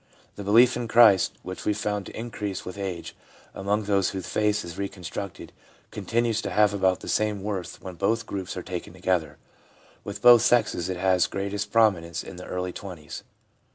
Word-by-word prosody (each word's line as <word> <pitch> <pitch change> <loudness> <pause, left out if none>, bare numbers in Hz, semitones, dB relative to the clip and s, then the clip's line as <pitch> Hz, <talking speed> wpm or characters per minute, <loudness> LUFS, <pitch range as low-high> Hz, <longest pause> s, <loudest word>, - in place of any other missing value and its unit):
The 100 - -7
belief 115 +5 +5
in 120 -1 -3
Christ, 110 -4 +6
which 95 0 -7
we 105 - +1
found 105 -1 -2
to - - -8
increase 105 -5 -5
with 90 - -6
age 95 -4 -5 0.4
among 100 +2 -1
those 100 -2 +2
whose 95 -2 -5
faith 105 -2 0
is 85 0 -8
reconstructed, 100 -1 -6 0.4
continues 115 +3 0
to - - -4
have 105 -1 +3
about 95 -2 +1
the - - -9
same 105 -2 0
worth 100 -4 -4
when 95 - -7
both 115 +3 +1
groups 95 -3 -5
are 90 - -4
taken 90 -1 -6
together. 90 -3 -1 0.7
With 100 0 -7
both 120 -2 +9
sexes 105 -7 +2
it 95 - -2
has 95 -1 +3
greatest 100 +1 -3
promi 110 -6 +4
nence 85 0 -5
in 90 - -10
the 90 - -9
early 90 0 -3
twenties. 85 -6 -8
100 Hz, 185 wpm, -26 LUFS, 95-105 Hz, 0.7 s, both